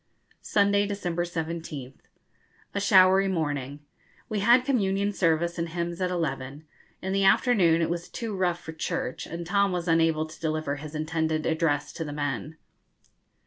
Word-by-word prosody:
Sunday, 200 0 +2
December 175 -4 -2
17th. 160 -6 -5 0.7
A 200 - -1
showery 190 -1 +6
morning. 145 -6 -2 0.5
We 215 -2 -1
had 240 +5 +5
Communion 200 -6 +1
Service 170 -1 +1
and 165 0 -2
hymns 170 +1 -4
at 180 - +1
eleven. 145 -4 -3 0.4
In 190 +1 -2
the 195 0 +2
afternoon 195 -5 +4
it 165 - 0
was 170 0 -4
too 225 -3 -4
rough 180 -2 0
for 160 - -8
'church,' 160 -4 -3
and 170 +1 -6
Tom 200 +2 +2
was 180 -1 -3
unable 165 -1 +3
to 155 - -12
deliver 155 -3 -2
his 150 +2 -8
intended 160 0 -1
address 160 -2 0
to 165 - -4
the 145 -2 -6
men. 145 +2 -3
170 Hz, 155 wpm, -27 LUFS, 155-195 Hz, 0.7 s, showery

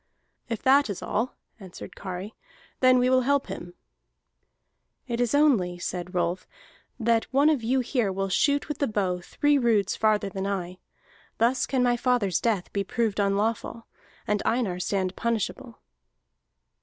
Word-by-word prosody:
"If 230 -3 -4
that 275 -1 +4
is 200 - -5
all," 230 +5 -2 0.2
answered 190 -3 -10
Kari, 190 +2 -6 0.5
"then 255 -1 +5
we 250 0 +3
will 255 0 +4
help 280 +2 +1
him." 175 0 -8 1.3
"It 240 -1 -2
is 245 +3 +1
only," 230 -13 +3
said 180 +1 -5
Rolf, 175 +1 -1 0.5
"that 230 -1 +2
one 285 +3 +4
of 290 -6 0
you 255 +4 +1
here 240 -5 0
will 195 +1 -2
shoot 285 +9 +1
with 300 -3 -5
the 280 - +1
bow 190 -4 -1
three 290 +10 +1
roods 220 -6 +2
farther 215 -2 +1
than 195 0 -4
I. 185 -2 -4 0.6
Thus 245 +3 +2
can 260 -2 +1
my 245 -1 +2
father's 235 -8 +1
death 215 -6 -1
be 200 - 0
proved 220 0 -1
unlawful, 210 +3 -1 0.4
and 210 -1 0
Einar 220 -7 0
stand 185 0 -1
punishable." 235 +2 -3
225 Hz, 155 wpm, -26 LUFS, 195-255 Hz, 1.3 s, then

